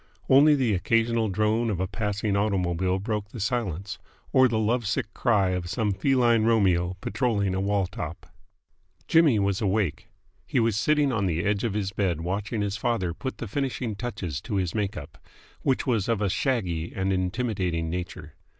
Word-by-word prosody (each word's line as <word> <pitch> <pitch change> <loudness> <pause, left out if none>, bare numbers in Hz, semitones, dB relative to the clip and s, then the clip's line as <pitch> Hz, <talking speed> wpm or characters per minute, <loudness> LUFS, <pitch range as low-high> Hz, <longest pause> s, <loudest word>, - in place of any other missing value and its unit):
Only 145 +3 +6
the 125 -6 +1
occasional 115 +3 +1
drone 110 +4 +1
of 100 -5 -2
a 95 - +1
passing 105 0 -2
automobile 95 -3 0
broke 105 +1 -3
the 115 - -9
silence, 100 -4 -2 0.3
or 130 0 +6
the 115 -2 -1
love 110 +1 0
sick 100 +1 -2
cry 105 -6 +2
of 90 -1 -3
some 105 +3 0
feline 120 +1 +3
Romeo 95 -6 +2
patrolling 105 -4 0
a 95 - -1
wall 100 -1 +1
top. 90 - -7 0.8
Jimmy 160 -8 +5
was 100 0 0
awake. 95 -4 0 0.4
He 130 - +1
was 115 -3 +2
sitting 145 +5 +2
on 100 -5 0
the 85 -1 -1
edge 100 0 +1
of 110 -4 -1
his 100 -2 -1
bed 95 -5 -1
watching 100 +5 -2
his 100 0 -2
father 110 -7 -1
put 130 +10 -5
the 115 - -5
finishing 125 -2 -2
touches 95 - -4
to 110 +2 -4
his 95 -3 0
make 105 -2 -2
up, 80 +2 -9 0.4
which 135 - 0
was 115 -6 0
of 115 -3 +1
a 105 -2 0
shaggy 95 -9 -1
and 95 0 0
intimidating 95 -3 -1
nature. 85 -4 -6
105 Hz, 180 wpm, -26 LUFS, 95-115 Hz, 0.8 s, Only